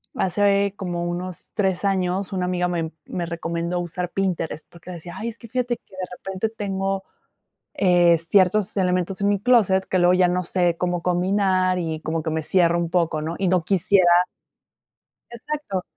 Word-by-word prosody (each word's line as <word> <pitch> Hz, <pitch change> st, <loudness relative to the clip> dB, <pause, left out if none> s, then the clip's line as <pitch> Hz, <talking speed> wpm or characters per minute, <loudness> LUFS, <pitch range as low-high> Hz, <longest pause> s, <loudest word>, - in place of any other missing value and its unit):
hace 200 Hz, +1 st, +2 dB
como 175 Hz, -2 st, -3 dB
unos 175 Hz, 0 st, -5 dB
3 195 Hz, -2 st, 0 dB
años, 190 Hz, 0 st, 0 dB
una 185 Hz, -, -1 dB
amiga 180 Hz, 0 st, 0 dB
me 165 Hz, -2 st, -2 dB
me 175 Hz, -, -4 dB
recomendó 170 Hz, +1 st, -3 dB
usar 175 Hz, +1 st, -4 dB
Pinterest, 175 Hz, -5 st, -2 dB
porque 170 Hz, +1 st, -12 dB
decía: 175 Hz, 0 st, -9 dB
"Ay, 230 Hz, -, -3 dB
es 230 Hz, -, -10 dB
que 230 Hz, -, -12 dB
fíjate 245 Hz, 0 st, -1 dB
que, 190 Hz, -, -20 dB
de 185 Hz, -1 st, -4 dB
repente, 195 Hz, +3 st, -3 dB
tengo, 195 Hz, -2 st, -3 dB, 0.7 s
eh, 175 Hz, -, +4 dB
ciertos 190 Hz, +5 st, +2 dB
elementos 185 Hz, 0 st, 0 dB
en 200 Hz, -, +2 dB
mi 200 Hz, -1 st, +1 dB
clóset, 205 Hz, -5 st, +3 dB
que 185 Hz, -, 0 dB
luego 175 Hz, +1 st, +5 dB
ya 180 Hz, -1 st, +4 dB
no 180 Hz, 0 st, 0 dB
sé 175 Hz, -1 st, +1 dB
cómo 180 Hz, -1 st, -1 dB
combinar 185 Hz, +1 st, +1 dB
y 160 Hz, -2 st, -3 dB
como 160 Hz, 0 st, -2 dB
que 160 Hz, -, -2 dB
me 160 Hz, 0 st, -1 dB
cierra 170 Hz, +1 st, +3 dB
un 170 Hz, -1 st, -1 dB
poco, 165 Hz, -3 st, +1 dB
¿no?, 165 Hz, +2 st, -3 dB
y 190 Hz, -2 st, +1 dB
no 180 Hz, -2 st, +2 dB
quisiera" 195 Hz, +1 st, +3 dB, 1.3 s
Exacto. 235 Hz, -5 st, -4 dB
185 Hz, 175 wpm, -23 LUFS, 175-195 Hz, 1.3 s, luego